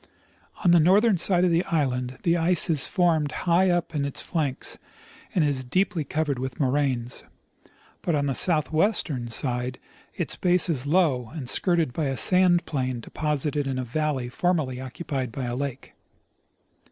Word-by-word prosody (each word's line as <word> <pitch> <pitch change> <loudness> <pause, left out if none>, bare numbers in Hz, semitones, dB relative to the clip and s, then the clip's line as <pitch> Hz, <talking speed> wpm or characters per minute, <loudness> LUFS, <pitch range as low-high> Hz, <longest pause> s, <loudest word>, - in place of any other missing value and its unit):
On 175 - +6
the 175 - +6
north 190 +8 +4
ern 205 -7 +3
side 180 0 +3
of 180 - +2
the 170 +2 +2
island 130 -5 -1
the 170 -1 +2
ice 175 +1 +3
is 150 -4 +3
forced 165 -6 +1
high 180 +2 +3
up 175 -1 -1
on 145 -2 -1
its 140 -1 -2
flanks, 150 -6 -2 0.6
and 175 - +3
is 140 -3 -1
deeply 175 +4 0
covered 145 -2 -2
with 130 -1 -5
moraines; 130 -3 0 0.8
but 170 - 0
on 145 -1 0
the 140 - 0
southwestern 155 - +1
side 125 +1 0 0.4
its - - -1
base 180 -1 +3
is 145 -4 -1
low 145 -8 +1
and 140 -6 -6
skirted 165 -1 +1
by 155 - -2
a 135 -1 -2
sand 180 -2 +3
plain 130 -4 -2
deposited 150 +2 -2
in 135 -1 -2
a 130 - -2
valley 135 0 -2
formerly 135 -3 -1
occupied 130 -1 -5
by 130 +3 -5
a 120 0 -3
lake. 135 0 -5
150 Hz, 165 wpm, -25 LUFS, 130-175 Hz, 0.8 s, On